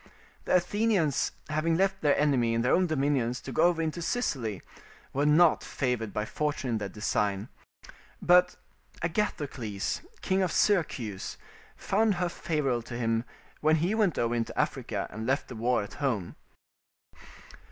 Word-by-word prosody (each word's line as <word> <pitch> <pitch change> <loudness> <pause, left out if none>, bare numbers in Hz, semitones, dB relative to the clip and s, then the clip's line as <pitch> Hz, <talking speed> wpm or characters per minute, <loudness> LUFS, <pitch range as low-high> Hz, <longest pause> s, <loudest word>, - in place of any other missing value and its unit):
The - - +2
Athenians 180 - +1 0.2
having 155 +2 +1
left 195 +1 +1
the 145 -2 +3
enemy 125 -6 +2
in 115 - +1
their 125 - +3
own 185 0 +3
dominions 135 -5 0
to 135 - -7
go 155 +7 +3
over 170 -2 +2
into 160 +2 -3
Sicily, 130 - -2 0.5
were 145 +2 +1
not 160 +2 +5
favoured 125 -5 -2
by 105 +1 -2
fortune 145 -1 -2
in 115 - +1
their 100 -1 -4
design; 105 +1 -1 0.7
but 180 0 +4 0.5
Agathocles, 145 - -2 0.2
king 190 +1 +1
of 185 -3 +1
Syracuse, 130 - 0 0.4
found 210 +1 +1
her 175 0 0
favourable 150 -9 -1
to 120 +1 -7
him 115 0 0 0.3
when 155 +1 +4
he 170 +6 +1
went 210 -7 +2
over 120 0 +1
into 115 -1 -2
Africa - - -1
and 110 +1 -5
left 135 +2 0
the 125 - -7
war 120 0 +1
at 100 - -9
home. 120 - -2
145 Hz, 150 wpm, -28 LUFS, 115-175 Hz, 0.7 s, not